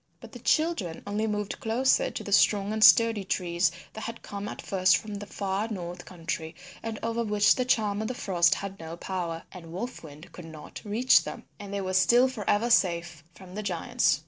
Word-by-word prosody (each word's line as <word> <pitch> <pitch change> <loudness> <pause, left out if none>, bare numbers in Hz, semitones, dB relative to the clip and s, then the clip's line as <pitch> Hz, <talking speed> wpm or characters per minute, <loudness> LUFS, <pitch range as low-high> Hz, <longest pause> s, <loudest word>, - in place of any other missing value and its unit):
But - - -12
the - - -10
children 310 - 0
only 210 +2 -1
moved 210 -1 -3
closer 260 - +2
to - - -6
the - - -7
strong 205 0 +3
and 220 0 +1
sturdy 225 -3 +6
trees 175 -2 0 0.2
that 220 - -7
had 230 0 -7
come 200 0 -6
at - - -7
first 185 -2 +3
from 215 -1 -8
the 205 0 -6
far 200 +2 -2
north 175 -4 -6
country 165 -2 -5 0.3
and 225 -1 -5
over 230 +1 -1
which 210 -1 +4
the 255 - -1
Charm 215 -4 +1
of 220 - -2
the 255 - -4
Frost 175 -6 +2
had 195 0 -6
no 165 +1 -7
power, 170 -3 -4
and 165 -3 -11
Wolf 240 +9 -5
Wind 155 +3 -12
could 175 - -10
not 155 -2 -10
reach 225 +5 +4
them 240 - -7 0.2
and 200 -1 -8
they 200 0 -2
were 185 -1 -3
still 240 +7 +5
for 230 -7 -5
ever 230 +4 +2
safe 170 -6 +1
from 185 -1 -13
the 210 - -4
giants. 175 -6 +1
200 Hz, 210 wpm, -27 LUFS, 175-220 Hz, 0.3 s, sturdy